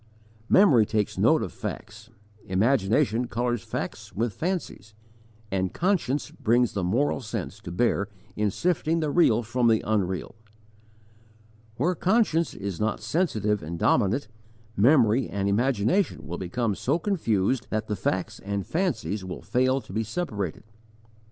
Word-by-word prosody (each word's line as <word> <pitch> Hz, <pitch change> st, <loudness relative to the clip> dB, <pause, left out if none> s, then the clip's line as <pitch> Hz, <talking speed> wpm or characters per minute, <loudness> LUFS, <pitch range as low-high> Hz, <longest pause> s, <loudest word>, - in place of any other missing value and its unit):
Memory 150 Hz, -, +6 dB
takes 105 Hz, -2 st, -1 dB
note -, -, +4 dB
of -, -, -6 dB
facts, 110 Hz, -, -7 dB, 0.4 s
imagination 115 Hz, +4 st, +2 dB
colours 120 Hz, -1 st, -1 dB
facts -, -, -5 dB
with 115 Hz, +1 st, -1 dB
fancies, 155 Hz, -, -4 dB, 0.6 s
and 95 Hz, -1 st, -1 dB
conscience 170 Hz, -7 st, 0 dB
brings 120 Hz, +1 st, +1 dB
the 100 Hz, -, -2 dB
moral 125 Hz, +10 st, +1 dB
sense 105 Hz, -, -5 dB
to -, -, -8 dB
bear 100 Hz, +1 st, +1 dB, 0.3 s
in 105 Hz, 0 st, +1 dB
sifting 165 Hz, -, 0 dB
the 155 Hz, -2 st, -1 dB
real 120 Hz, -9 st, +4 dB
from 120 Hz, +2 st, +1 dB
the 110 Hz, -1 st, +3 dB
unreal. 95 Hz, -4 st, -1 dB, 1.4 s
Where 160 Hz, +10 st, +1 dB
conscience 180 Hz, -3 st, +1 dB
is 100 Hz, -3 st, -5 dB
not 110 Hz, 0 st, 0 dB
sensitive 105 Hz, -, 0 dB
and 85 Hz, +3 st, -5 dB
dominant, 110 Hz, +7 st, +2 dB, 0.5 s
memory 120 Hz, 0 st, +4 dB
and 100 Hz, 0 st, -2 dB
imagination 120 Hz, -, +1 dB
will 85 Hz, +3 st, -5 dB
become 105 Hz, +4 st, -1 dB
so 135 Hz, +10 st, 0 dB
confused 130 Hz, -, 0 dB
that 110 Hz, 0 st, -1 dB
facts 95 Hz, -1 st, -2 dB
and 100 Hz, 0 st, -3 dB
fancies 110 Hz, -, -1 dB
will 95 Hz, -1 st, -7 dB
fail 130 Hz, +2 st, +1 dB
to 95 Hz, -, -12 dB
be 110 Hz, -, 0 dB
separated. 105 Hz, -, -4 dB
115 Hz, 135 wpm, -26 LUFS, 100-140 Hz, 1.4 s, Memory